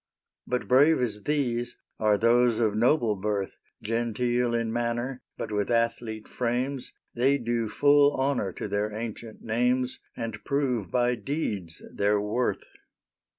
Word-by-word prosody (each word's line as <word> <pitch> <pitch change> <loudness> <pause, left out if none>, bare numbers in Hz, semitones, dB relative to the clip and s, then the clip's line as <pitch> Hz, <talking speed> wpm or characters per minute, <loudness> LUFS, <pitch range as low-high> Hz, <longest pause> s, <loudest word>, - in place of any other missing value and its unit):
But 125 0 -2
brave 145 +5 +5
as 105 -4 -2
these 125 -5 0 0.2
are 105 -1 +3
those 120 +1 +4
of 110 -3 +2
noble 120 -1 +3
birth; 100 0 -2 0.3
Genteel 120 +2 0
in 115 -1 -1
manner, 120 +2 -2 0.2
but - - -5
with 105 -1 -1
athlete 115 -2 -1
frames, 125 +2 -2 0.2
They 135 +4 +3
do 120 -3 -1
full 145 +2 +4
honor 135 -7 0
to - - -5
their 105 +1 -1
ancient 110 0 -7
names, 125 +3 0 0.2
And 115 -2 -5
prove 130 -9 0
by 125 +2 +2
deeds 110 - -3
their 100 +1 +2
worth. 105 +5 -1
120 Hz, 135 wpm, -27 LUFS, 110-125 Hz, 0.3 s, brave